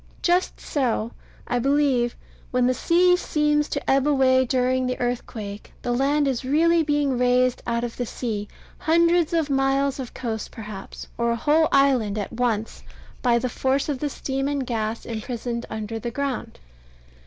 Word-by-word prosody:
Just 355 +1 +1
so, 240 -5 -1 0.4
I 245 - 0
believe, 270 -2 +2 0.3
when 250 -1 +2
the 255 - +3
sea 360 +6 +4
seems 300 -3 +1
to 285 - -4
ebb 270 +1 +3
away 260 -2 +4
during 255 0 +1
the 255 - -2
earthquake, 220 -4 -4
the 245 - -1
land 280 +4 +2
is 265 -2 -1
really 330 +5 +3
being 290 -4 +1
raised 250 0 +2
out 235 0 0
of 240 -1 -4
the 245 - -1
sea, 215 -4 -4 0.3
hundreds 335 0 +3
of 320 -4 0
miles 270 0 +1
of 255 -3 -7
coast, 225 -3 -4
perhaps, 210 -4 -8
or 235 0 +1
a 235 - +1
whole 305 +6 +3
island, 255 -7 +3
at 205 +1 -4
once, 230 -2 -1 0.4
by 240 -2 +3
the 255 - -1
force 265 +4 0
of 280 -3 -2
the 295 - -1
steam 270 0 -3
and 280 -2 -1
gas 225 -2 -3
imprisoned 235 +1 -4
under 220 +1 -4
the 235 - -4
ground. 275 +1 -4
255 Hz, 165 wpm, -24 LUFS, 235-285 Hz, 0.4 s, sea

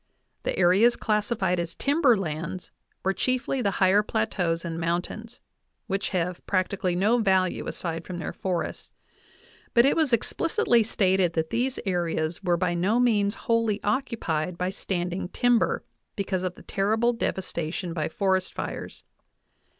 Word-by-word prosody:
The - - -2
areas 190 +7 +5
classified 210 -4 0
as 170 -1 -4
timber 280 -5 +3
lands 170 0 -4 0.3
were 190 - +3
chiefly 255 +3 0
the 205 - +2
higher 190 +2 +5
plateaus 165 - -1
and 165 -1 -4
mountains, 175 +8 -3 0.4
which 195 +1 -2
have 180 -1 -2
prac 185 -2 +1
tically 185 -3 -1
no 215 +6 +3
value 190 -4 +1
aside 165 -1 -3
from 180 0 -6
their 165 - -4
forests; 180 -3 -3 0.8
but 235 +1 +7
it 275 - +4
was 315 -5 +2
explicitly 245 - +2
stated 190 -5 +2
that 160 -1 -1
these 250 +3 0
areas 170 -3 -1
were 175 -2 +2
by 180 0 0
no 190 +7 +2
means 210 -4 +2
wholly 230 -3 +2
occupied 180 - -1
by 180 +1 -1
standjng 180 -1 -3
timber, 245 -2 +2 0.3
because 195 -2 -1
of 185 -1 -3
the - - -14
terrible 220 +5 +1
devastation 180 -5 -3
by 160 -2 -2
forest 190 +1 0
fires. - - -6
190 Hz, 145 wpm, -26 LUFS, 175-225 Hz, 0.8 s, but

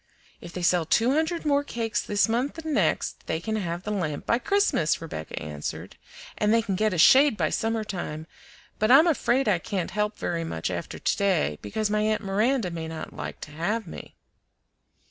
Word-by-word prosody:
"If 170 - -9
they 180 0 -5
sell 175 0 +3
two 225 +10 +2
hundred 320 +2 0
more 285 -1 +2
cakes 230 -5 -2
this 205 +2 +1
month 245 +7 -1
and 315 -1 -4
next, - - 0
they 160 - -1
can 220 +6 -3
have 175 -3 -3
the 210 - -4
lamp 165 -8 -2
by 235 - +2
Christmas," 400 - +1
Rebecca 150 - -6
answered, 75 0 -6 0.4
"and 210 0 +2
they 230 0 +3
can 205 -3 -2
get 215 +3 +1
a 180 - -2
shade 265 - +6
by - - 0
summer 225 0 -1
time; 165 -6 -5 0.5
but 215 - +2
I'm 275 +6 +8
afraid 270 -5 +2
I 195 -5 +3
can't 185 -1 -3
help 210 +1 -1
very 170 -1 -2
much 80 - -3
after - - -5
to - - 0
day, 180 - +1
because 210 - -2
my 210 0 +1
aunt 215 0 0
Miranda 210 +1 +1
may 165 -1 -5
not 160 0 -7
like - - -7
to 145 - -8
have 195 +9 -2
me." 165 - -10
210 Hz, 200 wpm, -26 LUFS, 170-235 Hz, 0.5 s, I'm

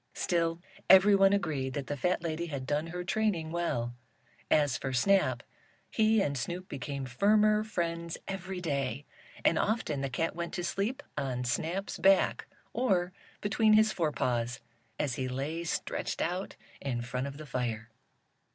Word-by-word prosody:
Still 165 -1 0 0.3
everyone 195 0 +7
agreed 145 -10 -1
that 140 - -3
the 145 - -3
fat 180 +5 0
lady 170 +1 -2
had 140 -4 -4
done 150 +4 0
her 180 +1 -4
training 185 -5 0
well. 120 -9 -1 0.6
As 145 -4 +3
for 130 0 -3
Snap, 130 -4 +3 0.5
he 220 -1 +3
and 140 -4 -1
Snoop 175 +9 -4
became 140 0 -4
firmer 210 - +3
friends 170 -5 -3
every 190 -1 -4
day, 140 -5 -2 0.4
and 165 - +4
often 205 -10 0
the 135 - -1
cat 165 +6 -1
went 170 0 -4
to 175 - -2
sleep 210 +10 -2 0.2
on 125 -2 -2
Snap's 165 +10 -2
back, 195 0 +4 0.3
or 185 -7 +1 0.3
between 215 +1 +3
his 215 0 +5
forepaws 125 - -1 0.4
as 140 -5 -1
he 130 - -1
lay 140 +6 -3
stretched 165 - -2
out 180 +3 -2 0.3
in 120 -4 -2
front 125 +2 -3
of 140 0 -7
the 155 - -8
fire. 120 -4 -3
165 Hz, 150 wpm, -30 LUFS, 135-190 Hz, 0.6 s, everyone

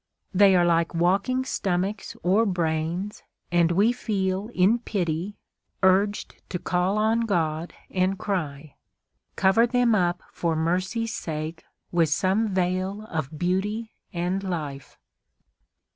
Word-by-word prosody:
They 195 0 +6
are 175 -1 +4
like 170 0 +2
walking 200 +10 +1
stomachs 195 -2 -2
or 195 +5 +4
brains, 170 +2 -1 0.3
and 175 -1 +3
we 200 +7 +4
feel, 195 -4 -1
in 210 +4 +3
pity, 185 -3 -2 0.5
urged 195 +2 +2
to 180 - -2
call 180 +2 0
on 220 +2 +2
God 170 -7 -1 0.2
and 185 +1 +1
cry, 155 -8 -3 0.6
"Cover 200 +5 +4
them 245 -1 +3
up 175 -3 +1
for 165 -2 -1
mercy's 185 +8 -1
sake 160 -1 -5 0.3
with 170 -3 +3
some 190 +8 +2
veil 185 +1 -1
of 155 -2 -3
beauty 205 +6 -1 0.2
and 180 +1 -1
life!" 155 -8 -5
185 Hz, 120 wpm, -25 LUFS, 170-205 Hz, 0.6 s, They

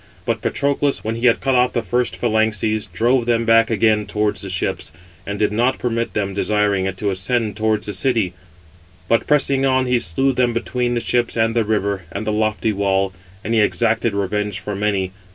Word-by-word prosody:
But - - -1
Patroclus, 140 0 0
when 110 - -2
he 115 +2 +1
had 115 - +3
cut 135 -1 +1
off 125 0 +3
the 120 - -1
first 120 +1 -1
phalanxes, 110 -2 0
drove 120 +1 +1
them 115 -1 +1
back 115 0 +4
again 110 -1 +2
towards 105 0 -1
the 100 - -6
ships, 90 -4 -3 0.4
and 100 0 -3
did 105 0 +1
not 120 +5 +1
permit 115 -1 -2
them, 100 -2 -1
desiring 100 -1 +1
it, 95 -1 -4
to 100 0 -1
ascend 105 +4 -1
towards 110 -1 0
the 105 - -4
city; 105 -2 0 0.7
but, 115 - +1
pressing 140 -2 +2
on, 130 -1 +2
he 125 -1 +2
slew 125 +9 0
them 125 -1 +1
between 120 +1 -1
the 120 - 0
ships, 120 -1 0
and 115 0 +1
the 115 - +3
river, 100 -3 -1
and 105 +2 -5
the 105 - 0
lofty 110 0 0
wall, 95 -1 0 0.3
and 115 - -2
he 115 - +3
exacted 115 0 +1
revenge 105 0 -2
for 105 - -5
many. 100 -2 -1
110 Hz, 200 wpm, -20 LUFS, 105-120 Hz, 0.7 s, back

